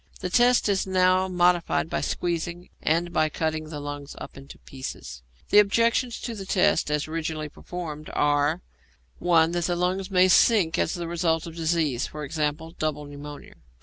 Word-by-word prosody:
The 180 - -4
test 245 +1 +4
is 195 -2 0
now 185 0 +3
modified 175 -2 +2
by - - -2
squeezing, 175 0 -3
and 170 +2 0
by 155 -1 +2
cutting 155 0 -3
the 150 -2 -6
lungs 145 0 -7
up - - -9
into 135 +1 -12
pieces. 100 - -8 0.3
The 205 - +8
objections 230 +3 +2
to 235 - -4
the 195 -3 -8
test 185 -5 +2
as 150 0 -1
originally 155 -1 -3
performed 155 -2 -7
are 145 +4 +1 0.6
(1) 165 -2 +3
That 175 -1 -1
the 175 - 0
lungs 185 +2 -1
may 185 -1 +4
sink 185 -3 +4
as 165 - 0
the 170 -1 -4
result 165 -1 0
of 165 -1 -9
disease 160 -6 0
e.g., 150 +2 -3
double 150 -1 -2
pneumonia. 145 0 -10
165 Hz, 165 wpm, -25 LUFS, 150-180 Hz, 0.6 s, The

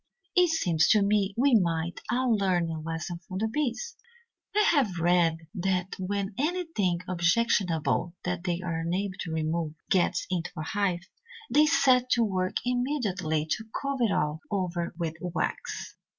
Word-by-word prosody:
"It 360 -1 +5
seems 175 - +2
to 210 -2 +5
me 200 -1 +1
we 270 +2 +4
might 170 -5 +1
all 245 -1 +2
learn 180 -5 +1
a 160 -1 -4
lesson 165 +2 -4
from 185 +2 -7
the 220 +3 0
bees. 300 - -2 0.6
I 425 - +5
have 240 - +2
read 165 -1 +2
that 185 -1 -1
when 195 +1 -2
anything 295 - 0
objectionable 180 -2 +1
that 180 -1 -2
they 175 -1 -1
are 170 -3 -2
unable 185 +4 -1
to 165 - -4
remove 160 0 -1 0.2
gets 185 -2 +2
into 175 -1 -1
a 155 - -3
hive, 185 0 -1 0.4
they 300 +1 +5
set 260 -3 +4
to 235 - +3
work 185 -3 -1
immediately 215 - 0
to 220 - 0 0.2
cover 275 -3 0
it 215 - +1
all 150 -1 0
over 180 -4 -2
with 165 -2 -2
wax. 175 -3 -3
185 Hz, 155 wpm, -28 LUFS, 170-230 Hz, 0.6 s, It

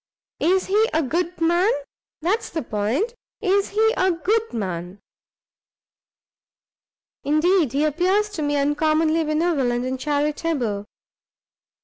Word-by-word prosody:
"Is 370 +3 +2
he 430 +3 +2
a 320 - +2
good 345 +6 -2
man? 345 +4 +3 0.5
that's 395 +7 0
the 320 - -3
point, 230 - -1 0.3
is 400 0 +1
he 440 +2 +2
a 375 0 +2
good 420 +7 0
man?" 180 -4 -4 2.3
"Indeed 310 0 +2
he 290 +2 +2
appears 370 +7 +1
to 350 - -5
me 290 -1 0
uncommonly 310 +3 +2
benevolent 300 -6 0
and 260 0 -3
charitable." 290 -7 -1
315 Hz, 110 wpm, -22 LUFS, 280-370 Hz, 2.3 s, man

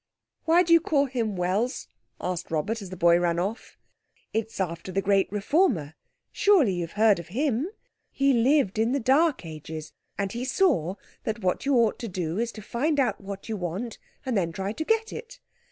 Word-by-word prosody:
"Why 340 +2 +5
do 335 -1 +3
you 335 - +8
call 290 -4 +2
him 235 -6 -2
'Wells'?" 195 +9 -1 0.3
asked 180 -2 -3
Robert, 185 +9 -1
as 195 - -8
the 185 - -8
boy 170 0 +5
ran 170 -1 +1
off. 200 +7 -4 0.6
"It's 225 -1 -3
after 170 0 -3
the 190 - 0
great 195 -1 +2
reformer—surely 235 - +1
you've 170 -2 -4
heard 210 -2 +4
of 170 - -8
him? 260 - 0 0.4
He 275 0 +2
lived 240 -3 +3
in 225 +3 +2
the 280 - +1
dark 275 - +2
ages, 155 0 -8 0.2
and 200 -1 -1
he 235 +3 -4
saw 260 - +2 0.3
that 220 -1 -3
what 185 +8 0
you 280 - +3
ought 230 -3 +3
to 235 - -4
do 175 -2 -3
is 235 0 -1
to 215 - -9
find 285 +7 0
out 260 - +1
what 195 0 -7
you 220 - -2
want 195 +5 -4 0.3
and 255 -3 -1
then 175 -4 +1
try 195 +4 -3
to 315 - -3
get 445 +5 0
it. 475 +2 -9
220 Hz, 190 wpm, -26 LUFS, 180-275 Hz, 0.6 s, you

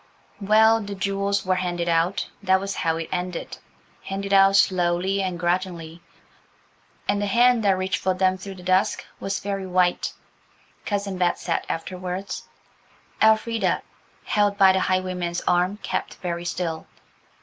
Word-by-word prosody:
Well, 220 +2 +4
the 200 -1 -6
jewels 200 +1 -1
were 185 - +2
handed 175 -1 -2
out–that 185 +3 +1
was 195 +1 -4
how 165 -1 0
it 165 -1 -4
ended–handed 195 +2 -6
out 195 0 +6
slowly 185 0 +2
and 185 -3 -3
grudgingly, 175 -1 -2 1.1
and 205 - +1
the 205 - 0
hand 240 +2 +4
that 195 -2 +3
reached 185 0 -1
for 185 0 0
them 185 0 +2
through 190 +1 -8
the 180 - -12
dusk 185 +3 +1
was 195 0 -2
very 195 -1 -4
white, 180 -1 +1 0.7
Cousin 200 -2 -2
Bet 180 -1 +2
said 170 - -2
afterwards. 185 +3 -5 0.7
Elfrida, 220 +1 +2 0.4
held 205 -1 +1
by 195 -1 +7
the 190 - +2
highwayman's 185 -2 -1
arm, 180 +3 +2
kept - - -3
very 175 -1 -4
still. 165 -2 -3
185 Hz, 140 wpm, -24 LUFS, 180-200 Hz, 1.1 s, by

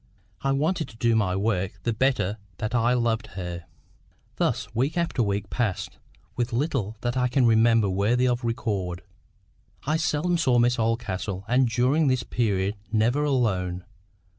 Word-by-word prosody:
I 135 - +1
wanted 155 +3 0
to 110 - -15
do 115 0 +2
my 95 -4 +1
work 95 -1 0
the 115 - 0
better 110 -4 0 0.2
that 110 +2 -3
I 120 0 +3
loved 115 -3 0
her. 85 -2 -5 0.7
Thus - - -1
week 135 +9 0
after 170 -7 0
week 100 -2 -1
passed, 110 -7 -2 0.4
with 120 0 -1
little 120 -5 -1
that 120 0 -1
I 125 -1 +2
can 125 0 +2
remember 115 -1 +4
worthy 105 +7 +2
of 120 0 0
record. 100 -7 -2 0.8
I 155 +3 +1
seldom 165 +2 0
saw 130 -6 +3
Miss 120 +1 +3
Oldcastle, 110 -4 -2
and 125 +1 +3
during 130 +6 +2
this 130 -1 +1
period 100 -3 -1
never 115 +6 +2
alone. 95 -10 0
115 Hz, 155 wpm, -25 LUFS, 105-130 Hz, 0.8 s, remember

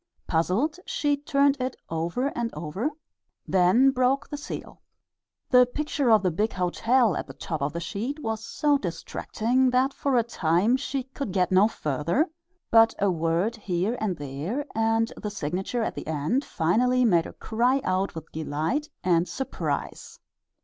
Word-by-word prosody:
Puzzled, 205 - 0
she 290 -1 +1
turned 280 -1 +2
it 255 0 -2
over 170 +12 -1
and 235 -4 -3
over, 170 - -2 0.6
then 190 +9 +4
broke 255 +1 +1
the - - -5
seal. 290 - -7 0.7
The 250 -1 +7
picture 290 0 -1
of 215 -3 +5
the 185 - +2
big 210 +7 -1
hotel 220 +5 +2
at - - -4
the - - -10
top 160 -3 -4
of 140 +1 0
the 170 - -4
sheet 225 - -4
was 220 -1 -3
so 290 +3 +1
distracting 225 +7 -1
that 255 +2 +2
for 275 -2 0
a 235 - +4
time 195 0 +2
she 270 0 -2
could 265 -3 -6
get 185 -1 +1
no 190 +3 +6
further, 170 - 0 0.4
but 225 0 +6
a 200 -1 +2
word 170 +6 0
here 195 +2 -1
and 195 -6 -1
there 145 - -4
and 225 0 +1
the 210 - -4
signature 195 +5 -2
at - - -2
the - - -7
end 160 - 0
finally 250 - +2
made 175 -7 +3
her - - -8
cry 245 +4 +1
out 185 0 0
with 160 -1 -8
delight 160 - -2
and 175 -1 +2
surprise. 265 - -4
220 Hz, 165 wpm, -26 LUFS, 175-255 Hz, 0.7 s, The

